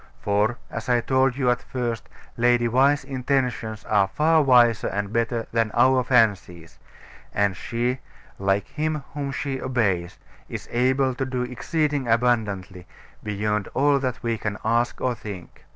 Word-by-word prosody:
For, 105 Hz, +4 st, +1 dB
as -, -, -5 dB
I 120 Hz, -1 st, +4 dB
told 130 Hz, +1 st, +2 dB
you 130 Hz, -3 st, +2 dB
at 125 Hz, -, -1 dB
first, 120 Hz, -3 st, -4 dB, 0.3 s
Lady 120 Hz, 0 st, +3 dB
Why's 135 Hz, +4 st, +3 dB
intentions 125 Hz, -5 st, -2 dB
are 100 Hz, -2 st, +3 dB
far 155 Hz, +10 st, +3 dB
wiser 120 Hz, -5 st, +4 dB
and 100 Hz, +1 st, -3 dB
better 115 Hz, 0 st, 0 dB
than 115 Hz, -1 st, +1 dB
our 130 Hz, +1 st, +4 dB
fancies; 100 Hz, -9 st, +1 dB, 0.6 s
and 100 Hz, -2 st, +2 dB
she 120 Hz, +4 st, -2 dB, 0.4 s
like 95 Hz, +1 st, +1 dB
Him 155 Hz, -1 st, -2 dB
whom 140 Hz, -1 st, -3 dB
she 135 Hz, -1 st, -3 dB
obeys 100 Hz, -9 st, -1 dB, 0.3 s
is -, -, -6 dB
able 130 Hz, +2 st, +2 dB
to 135 Hz, +2 st, -3 dB
do 125 Hz, -1 st, -2 dB
exceeding 140 Hz, +3 st, -1 dB
abundantly, 105 Hz, -6 st, 0 dB, 0.3 s
beyond 105 Hz, 0 st, -2 dB
all 140 Hz, +1 st, +3 dB
that 130 Hz, -3 st, -3 dB
we 115 Hz, -2 st, -1 dB
can 105 Hz, -1 st, -3 dB
ask 120 Hz, +2 st, +1 dB
or 125 Hz, -, 0 dB
think. 100 Hz, -5 st, -10 dB
120 Hz, 150 wpm, -24 LUFS, 105-130 Hz, 0.6 s, I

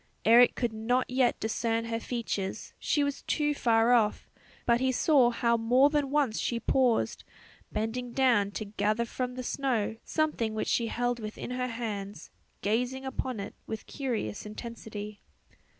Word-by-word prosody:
Eric 235 Hz, +3 st, +7 dB
could 240 Hz, -2 st, -1 dB
not 240 Hz, +4 st, 0 dB
yet 255 Hz, -1 st, +2 dB
discern 225 Hz, +1 st, -1 dB
her 230 Hz, 0 st, -2 dB
features, 225 Hz, -5 st, -4 dB
she 295 Hz, -, +1 dB
was 285 Hz, -1 st, -2 dB
too 295 Hz, -1 st, 0 dB
far 230 Hz, -3 st, +3 dB
off; 220 Hz, -3 st, +1 dB, 0.3 s
but 235 Hz, 0 st, +3 dB
he 260 Hz, 0 st, +2 dB
saw 260 Hz, -1 st, +4 dB
how 235 Hz, 0 st, +1 dB
more 250 Hz, +5 st, +4 dB
than 295 Hz, -3 st, +1 dB
once 275 Hz, -6 st, +1 dB
she 235 Hz, -, -1 dB
paused, 250 Hz, -2 st, +1 dB, 0.5 s
bending 225 Hz, +3 st, -3 dB
down 235 Hz, -6 st, +3 dB
to 215 Hz, +1 st, -5 dB
gather 210 Hz, +3 st, 0 dB
from 250 Hz, +1 st, -4 dB
the 255 Hz, -, -5 dB
snow 240 Hz, -5 st, -1 dB
something 270 Hz, -9 st, -1 dB
which 220 Hz, -, -2 dB
she 235 Hz, -, +1 dB
held 245 Hz, +1 st, -1 dB
within 215 Hz, +2 st, -6 dB
her 250 Hz, 0 st, -1 dB
hands, 210 Hz, -6 st, -5 dB, 0.3 s
gazing 250 Hz, +5 st, 0 dB
upon 260 Hz, -3 st, -3 dB
it 200 Hz, -, -6 dB
with 220 Hz, -, -5 dB
curious 235 Hz, -, -3 dB
intensity. 210 Hz, -1 st, -7 dB
235 Hz, 155 wpm, -29 LUFS, 220-255 Hz, 0.5 s, Eric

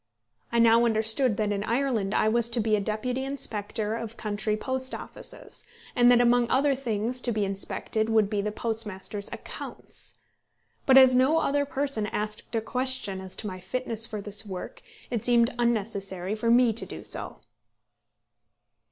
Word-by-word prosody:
I 235 Hz, -, 0 dB
now 230 Hz, 0 st, +5 dB
understood 220 Hz, +1 st, +3 dB
that 210 Hz, -1 st, 0 dB
in 200 Hz, 0 st, -1 dB
Ireland 230 Hz, -4 st, 0 dB
I -, -, +3 dB
was 235 Hz, +1 st, +2 dB
to 235 Hz, 0 st, -1 dB
be 215 Hz, -1 st, +2 dB
a -, -, 0 dB
deputy 230 Hz, +6 st, -2 dB
inspector 220 Hz, -5 st, -2 dB
of 230 Hz, -1 st, -6 dB
country 210 Hz, 0 st, -1 dB
post 260 Hz, +2 st, -3 dB
offices, -, -, -9 dB, 0.3 s
and 245 Hz, 0 st, +5 dB
that 245 Hz, -1 st, +6 dB
among 240 Hz, 0 st, +3 dB
other 275 Hz, +2 st, +3 dB
things 245 Hz, -1 st, -2 dB
to 245 Hz, -, -1 dB
be 210 Hz, -2 st, 0 dB
inspected 200 Hz, +3 st, -1 dB
would 220 Hz, -2 st, +3 dB
be 205 Hz, -1 st, -1 dB
the 210 Hz, +1 st, -2 dB
postmasters' 210 Hz, -2 st, -2 dB
accounts! -, -, -8 dB, 0.7 s
But 265 Hz, -1 st, +7 dB
as 260 Hz, -1 st, +8 dB
no 260 Hz, +5 st, +4 dB
other 285 Hz, -2 st, +1 dB
person 275 Hz, -7 st, -1 dB
asked 210 Hz, +2 st, -4 dB
a 225 Hz, -, +1 dB
question 250 Hz, -5 st, -2 dB
as 190 Hz, -1 st, -6 dB
to -, -, -3 dB
my 185 Hz, -2 st, -6 dB
fitness 230 Hz, +3 st, 0 dB
for 215 Hz, -3 st, -5 dB
this 205 Hz, +1 st, -1 dB
work, 205 Hz, -, -7 dB, 0.3 s
it 235 Hz, -4 st, -2 dB
seemed 240 Hz, 0 st, +3 dB
unnecessary 200 Hz, -5 st, -1 dB
for 220 Hz, +2 st, -1 dB
me 240 Hz, -1 st, +5 dB
to 230 Hz, -, -5 dB
do -, -, -8 dB
so. -, -, -5 dB
225 Hz, 170 wpm, -27 LUFS, 210-250 Hz, 0.7 s, as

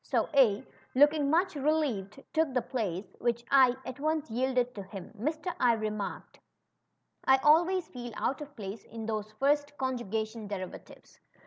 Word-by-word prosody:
So -, -, 0 dB
A, 235 Hz, -8 st, +4 dB, 0.3 s
looking 290 Hz, +1 st, +5 dB
much 355 Hz, +5 st, +2 dB
relieved, 275 Hz, -7 st, -1 dB
took 315 Hz, -4 st, +1 dB
the 220 Hz, -7 st, -1 dB, 0.8 s
at 260 Hz, +1 st, -6 dB
once 310 Hz, -3 st, -1 dB
yielded 250 Hz, +1 st, +1 dB
to 205 Hz, -, -6 dB
him; 195 Hz, 0 st, -9 dB
Mr. 310 Hz, -, -2 dB
I 245 Hz, -2 st, +5 dB
remarked, 215 Hz, -2 st, -4 dB, 0.8 s
I 265 Hz, -, +6 dB
alv^ays 340 Hz, +6 st, +4 dB
feel 245 Hz, -6 st, -8 dB
out 275 Hz, -, -1 dB
of 290 Hz, -1 st, -9 dB
place 200 Hz, 0 st, -7 dB
in 225 Hz, 0 st, -7 dB
those 215 Hz, -1 st, -3 dB
first 290 Hz, +4 st, +1 dB
conjugation 225 Hz, -4 st, -3 dB
derivatives. 190 Hz, -2 st, -8 dB
255 Hz, 135 wpm, -30 LUFS, 215-295 Hz, 0.8 s, I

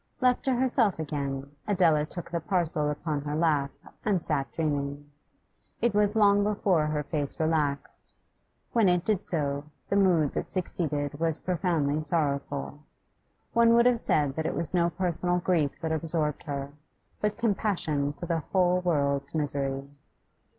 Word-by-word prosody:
Left 250 Hz, -1 st, +3 dB
to 265 Hz, -2 st, +2 dB
herself 240 Hz, -5 st, +2 dB
again, 140 Hz, -3 st, -4 dB, 0.2 s
Adela 165 Hz, -7 st, +3 dB
took 175 Hz, +1 st, -8 dB
the 170 Hz, -, -1 dB
parcel 160 Hz, -4 st, 0 dB
upon 150 Hz, 0 st, -2 dB
her 145 Hz, +1 st, -3 dB
lap 150 Hz, -4 st, +2 dB, 0.3 s
and 195 Hz, -5 st, +1 dB
sat 140 Hz, -3 st, -1 dB
dreaming. 145 Hz, -2 st, -3 dB, 0.7 s
It 235 Hz, -, +1 dB
was 210 Hz, +1 st, +2 dB
long 205 Hz, -1 st, +5 dB
before 195 Hz, -6 st, +1 dB
her 150 Hz, -1 st, -1 dB
face 145 Hz, -1 st, -3 dB
relaxed; 155 Hz, -3 st, -1 dB, 0.6 s
when 225 Hz, -5 st, +4 dB
it 180 Hz, 0 st, +1 dB
did 210 Hz, -4 st, 0 dB
so, 145 Hz, -3 st, -1 dB, 0.2 s
the -, -, +1 dB
mood 175 Hz, -7 st, +3 dB
that -, -, -4 dB
succeeded 150 Hz, -6 st, -2 dB
was 165 Hz, -1 st, +1 dB
profoundly 160 Hz, -5 st, 0 dB
sorrowful. 145 Hz, -2 st, -2 dB, 0.7 s
One 230 Hz, 0 st, +5 dB
would 235 Hz, 0 st, +5 dB
have 245 Hz, -2 st, +4 dB
said 145 Hz, -9 st, +1 dB
that 160 Hz, -, -1 dB
it -, -, -2 dB
was 170 Hz, 0 st, -3 dB
no 170 Hz, -1 st, +3 dB
personal 180 Hz, +1 st, -1 dB
grief 170 Hz, -5 st, 0 dB
that 160 Hz, -, -2 dB
absorbed 160 Hz, -2 st, 0 dB
her, 140 Hz, -1 st, -4 dB, 0.5 s
but 210 Hz, 0 st, 0 dB
compassion 190 Hz, -10 st, 0 dB
for 145 Hz, +4 st, -7 dB
the 170 Hz, -1 st, 0 dB
whole 180 Hz, +2 st, +2 dB
world's 140 Hz, -5 st, 0 dB
misery. 140 Hz, -2 st, -1 dB
160 Hz, 150 wpm, -28 LUFS, 145-185 Hz, 0.7 s, long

